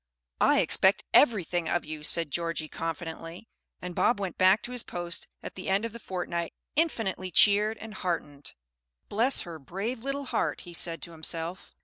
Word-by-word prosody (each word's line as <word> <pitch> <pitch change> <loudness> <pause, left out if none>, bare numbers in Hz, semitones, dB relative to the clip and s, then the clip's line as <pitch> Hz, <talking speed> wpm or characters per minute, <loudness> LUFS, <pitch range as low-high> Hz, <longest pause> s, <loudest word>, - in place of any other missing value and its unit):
"I - - +5
expect 190 +1 +3
everything 180 - +4
of 175 - 0
you," 155 0 -6
said 155 0 +5
Georgie 165 -1 -2
confidently. 165 +4 -6 0.4
And 180 0 -4
Bob 235 +5 +2
went 190 -4 -3
back 190 +3 +5
to 245 - -5
his 250 -1 -1
post 175 -5 -4 0.2
at - - -6
the 185 - -6
end 195 +3 +2
of 230 - -5
the 235 - -8
fortnight 175 -4 -4 0.2
infinitely 225 - 0
cheered 210 +5 +5
and 220 -1 -9
heartened. 155 -7 -4 0.5
"Bless 235 +6 +2
her 165 -2 -7
brave 200 - -4
little 275 +2 -3
heart!" - - -1
he 175 - -11
said 165 0 -2
to 170 - -5
himself. 165 +2 -4
180 Hz, 170 wpm, -28 LUFS, 165-215 Hz, 0.5 s, I